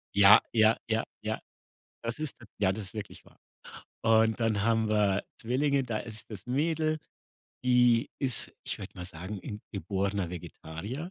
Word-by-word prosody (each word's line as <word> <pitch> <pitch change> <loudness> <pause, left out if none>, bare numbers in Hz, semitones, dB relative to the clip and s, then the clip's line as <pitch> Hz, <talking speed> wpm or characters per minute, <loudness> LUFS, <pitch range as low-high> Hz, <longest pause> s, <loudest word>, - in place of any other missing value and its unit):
Ja, 100 +1 +9
ja, 110 0 +5
ja, 110 0 +2 0.2
ja. 110 +1 -2 0.6
Das 115 +4 -3
ist 155 -3 -3
das 115 - -13
Ja, 95 -2 +3
das 105 +1 -5
ist 95 - -11
wirklich 105 -2 -7
wahr. - - -21 0.7
Und 110 0 +4
dann 110 -3 +1
haben 115 0 +2
wir 105 -2 +2 0.2
Zwillinge, 135 +4 +2
da 115 -4 -2
ist 110 0 -8
das 105 -4 -8
Mädel, 155 +4 +1 0.6
die 125 -2 +4
ist, 130 -4 -2
ich - - -3
würde - - -7
mal 90 -1 -6
sagen, 95 +3 -6
'n 105 0 -6
geborener 100 -2 -1
Vegetarier. 90 - -6
110 Hz, 160 wpm, -30 LUFS, 100-120 Hz, 0.7 s, Ja